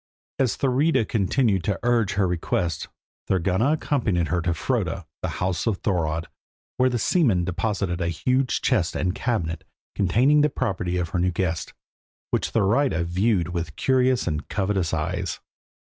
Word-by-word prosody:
As 130 -4 +2
Thurida 135 -1 +2
continued 105 -2 +1
to 100 -4 0
urge 120 -4 +2
her 100 -1 +2
request, 85 -1 -1 0.4
Thorgunna 95 - +2
accompanied 105 - 0
her 90 +1 +1
to 85 0 0
Froda, 95 -6 -1 0.2
the - - -1
house 90 +3 -1
of 110 -4 +1
Thorodd, 80 -4 0 0.5
where 130 0 +4
the 125 - -1
seamen 110 - +2
deposited 90 -1 -2
a 85 - 0
huge 125 +10 0
chest - - +1
and 90 0 0
cabinet, 85 -10 -2 0.3
containing 120 +10 +3
the 150 - +3
property 95 -9 -2
of 85 -2 -1
her 90 - -1
new 90 +1 +2
guest, 85 -2 -2 0.6
which - - 0
Thurida 110 - +2
viewed 90 0 +1
with 85 -4 -4
curious 130 +3 +2
and 75 -3 -3
covetous 95 -4 0
eyes. 75 -1 -2
95 Hz, 150 wpm, -24 LUFS, 85-120 Hz, 0.6 s, where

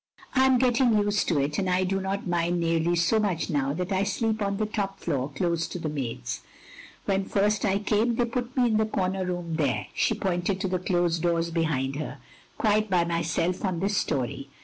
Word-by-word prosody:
"I 265 0 +5
am 260 -1 +5
getting 245 -2 +3
used 205 0 +1
to 160 -5 +2
it, 145 +4 0
and 190 -2 0
I 180 +1 +2
do 195 +1 0
not 195 +1 -2
mind 175 -1 0
nearly 165 0 +1
so 175 +6 +3
much 190 -5 -1
now 140 -2 +1
that 180 +4 -3
I 190 0 +2
sleep 220 +2 -1
on 200 -1 0
the 215 - 0
top 200 -2 -3
floor 140 -4 -1
close 165 +3 -1
to - - -6
the 160 -3 -3
maids. 115 - -4 0.6
When 195 0 +1
first 210 +2 +1
I 195 -1 +2
came 215 +3 +1
they 240 - +2
put 245 +2 -4
me 250 - +4
in 220 -3 +2
the 220 - +3
comer 190 -2 -1
room 175 -2 -3
therCy 125 - 0
" - - -26
she 225 - +1
pointed 190 -1 -1
to 195 - 0
the 185 0 -1
closed 175 -2 +1
doors 170 -1 +1
behind 145 -5 0
her, 150 -1 -5 0.4
"quite 215 0 +2
by 175 -2 +3
myself 170 +1 -1
on 185 -4 -1
this 200 +3 0
storey. 135 -3 -1
185 Hz, 215 wpm, -27 LUFS, 165-205 Hz, 0.6 s, I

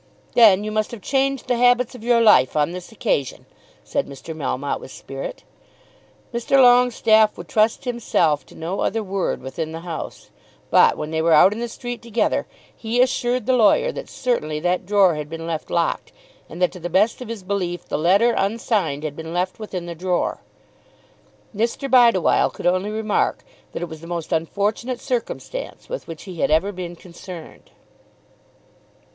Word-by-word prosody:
"Then 210 -4 +6
you 215 - -3
must 215 0 0
have 235 -5 -9
changed 275 -1 0
the 245 - +1
habits 245 0 +3
of 250 - -11
your 235 0 +3
life 210 - +5
on 150 +2 +2
this 180 +2 -8
occasion," 215 - -2 0.4
said - - -2
Mr. 140 +4 -9
Melmotte 140 -2 -2
with - - -11
spirit. - - -8 0.9
Mr. 235 +3 +1
Longestaffe 245 -4 +5
would - - -9
trust 220 +1 +2
himself 170 - +1
to - - -16
no 170 +4 -4
other 225 -1 0
word 195 -7 -2
within 160 +4 -5
the 165 - -6
house, 170 -2 -7 0.4
but, - - +5
when 150 +1 -5
they 160 0 0
were 165 0 +3
out 190 +6 +7
in 220 - -7
the 240 - -2
street 245 +1 -7
together, 235 -2 0 0.3
he 230 +2 -2
assured 250 -2 +1
the 260 - +2
lawyer 255 - +4
that - - -8
certainly 155 -12 -2
that 180 +2 -1
drawer 200 -3 +4
had 150 -1 -5
been 165 0 -6
left 165 -2 -4
locked, 170 -1 -1 0.4
and - - -9
that 180 - +3
to 180 - -10
the 175 +1 -5
best 210 +8 +2
of 250 - -6
his 225 -4 -6
belief 180 -3 -3
the - - -3
letter 195 +10 +3
unsigned 200 - 0
had 150 -2 -4
been 160 +1 -7
left 185 +3 -1
within 190 -5 -5
the 170 - -5
drawer. 180 +1 -1 1.1
Mr. 230 +6 -1
Bideawhile 235 -8 +4
could - - -9
only 185 +3 +1
remark 215 -1 -1 0.3
that - - -5
it - - -3
was 160 -1 -10
the 165 - -10
most 170 -1 -5
unfortunate 205 +9 -1
circumstance 255 - -5
with - - -5
which 165 -2 -8
he 180 -4 -9
had - - +2
ever 160 +6 +2
been 180 -2 -7
concerned. 175 -1 -11
200 Hz, 180 wpm, -22 LUFS, 170-235 Hz, 1.1 s, out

